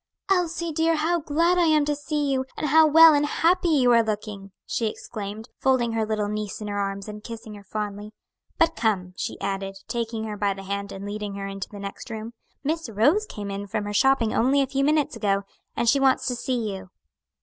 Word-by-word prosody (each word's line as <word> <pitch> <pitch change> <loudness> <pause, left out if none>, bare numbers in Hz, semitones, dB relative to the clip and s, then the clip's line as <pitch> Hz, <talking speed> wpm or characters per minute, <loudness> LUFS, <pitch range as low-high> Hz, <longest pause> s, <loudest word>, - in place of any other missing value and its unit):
"Elsie, 340 -2 +1
dear, 325 +1 +2
how 330 +3 +1
glad 335 +4 +2
I 345 - +4
am 305 -2 +4
to 295 0 0
see 295 -1 -1
you! 260 -1 +1
and 305 - -1
how 315 +2 +7
well 325 +1 +8
and 290 0 +3
happy 345 +4 +2
you 265 -6 +4
are 235 -1 +6
looking!" 210 -2 -5
she 230 - -1
exclaimed, 215 +1 -6
folding 255 -3 +2
her 225 -1 -1
little 215 -1 -1
niece 210 -1 -4
in 210 - -6
her 205 0 -2
arms, 195 0 -3
and 210 0 -8
kissing 230 -1 -8
her 205 -1 -11
fondly. 210 +1 -5 0.5
"But 330 0 +3
come," 190 -5 0
she - - -4
added, 195 0 -3
taking 230 -1 -3
her 215 -1 -5
by 200 -1 0
the 195 - -9
hand 200 +1 -4
and 195 +1 -7
leading 205 0 -5
her 200 0 -5
into 195 0 -6
the 210 - -10
next 200 +4 -7
room, 225 +1 -6 0.3
"Miss 320 -1 -2
Rose 290 - +2
came 205 -1 -6
in 200 +1 -5
from 205 - -2
her 205 0 -4
shopping 265 -1 +3
only 275 +4 +3
a - - 0
few 275 +1 -1
minutes 300 0 +2
ago, 200 -1 0 0.3
and 235 - 0
she 280 +4 +5
wants 270 -1 +3
to 250 - -1
see 240 -3 -2
you." 190 -1 -10
225 Hz, 220 wpm, -25 LUFS, 205-295 Hz, 0.5 s, well